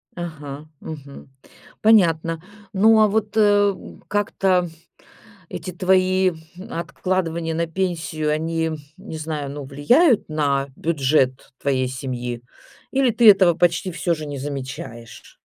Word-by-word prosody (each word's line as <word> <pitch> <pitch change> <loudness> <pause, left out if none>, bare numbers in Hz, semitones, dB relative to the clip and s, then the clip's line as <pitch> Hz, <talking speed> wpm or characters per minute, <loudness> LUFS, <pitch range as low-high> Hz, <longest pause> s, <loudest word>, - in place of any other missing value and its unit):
Ага. 150 -4 -7 0.2
Мгм. 140 -3 -9 0.5
Понятно. 165 -7 +3 0.3
Ну, 220 +3 +5
а 215 - +6
вот, 210 0 0
э, 205 -1 +4 0.3
как-то 190 -3 +1 0.8
эти 175 +2 -6
твои 185 +1 +2 0.4
откладывания 170 -3 -2
на 165 +1 -1
пенсию, 165 -3 -2
они, 160 +1 -1 0.3
не 160 - -8
знаю, 150 -3 -4
ну, 145 0 -6
влияют 215 - +3
на 140 -3 0
бюджет 135 -5 0
твоей 130 -2 +1
семьи 125 -2 -5 0.5
или 265 -2 +2
ты 230 0 +6
этого 190 -4 +6
почти 175 +2 +1
всё 170 0 -1
же 155 -1 -7
не 145 -2 -6
замечаешь? 130 -4 -7
165 Hz, 115 wpm, -22 LUFS, 145-190 Hz, 0.8 s, а